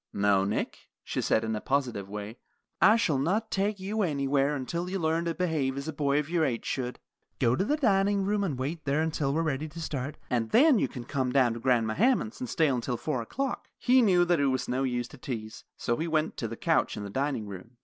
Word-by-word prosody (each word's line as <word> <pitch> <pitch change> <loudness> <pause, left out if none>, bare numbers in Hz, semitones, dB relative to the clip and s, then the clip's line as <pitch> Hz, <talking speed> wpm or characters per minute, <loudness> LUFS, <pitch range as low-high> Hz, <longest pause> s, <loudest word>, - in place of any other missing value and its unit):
"No, 100 -1 +3
Nick," 100 - -3
she - - -2
said, 110 - +2
in 110 0 -1
a 105 - -4
positive 125 -8 -1
way, 105 +3 -7 0.4
"I 210 +5 +7
shall 165 -12 +1
not 205 +10 0
take 200 +1 0
you 205 +3 -2
anywhere 140 -4 +1
until 170 +7 -3
you 195 - -2
learn 165 -1 0
to 165 -1 -1
behave 155 -7 0
as 140 +2 -5
a 160 - -3
boy 140 -1 +1
of 150 -1 0
your 170 0 +1
age 125 -6 -1
should. 125 -2 -3 0.4
Go 120 +1 +3
to 170 - +1
the 295 +9 +1
dining 200 -6 +2
room 205 0 +1
and 155 -9 -2
wait 145 +4 -4
there 145 +3 +1
until 150 -3 -1
we 160 +3 +1
are - - 0
ready 155 -1 -1
to 155 +2 -10
start, 145 -3 -4
and 115 -3 -1
then 280 - +5
you - - +1
can 125 -4 -8
come 130 0 -1
down 125 -3 +3
to 115 - -6
Grandma 115 -3 +2
Hammond's 235 - +1
and 255 - -4
stay 160 -3 +2
until 125 -2 -1
four 140 -3 -2
o'clock." 265 - -3
He 255 +1 +4
knew 180 -6 +4
that 175 -2 +2
it 140 - +3
was 130 -1 0
no 130 +2 -1
use 125 -2 -1
to - - -13
tease, 110 -4 -6
so 120 - 0
he 165 - -2
went 155 -1 0
to 115 - -2
the 115 +1 -7
couch - - +1
in 105 - -4
the 100 - -6
dining 135 -2 -1
room. 100 +4 -10
145 Hz, 245 wpm, -28 LUFS, 125-175 Hz, 0.4 s, I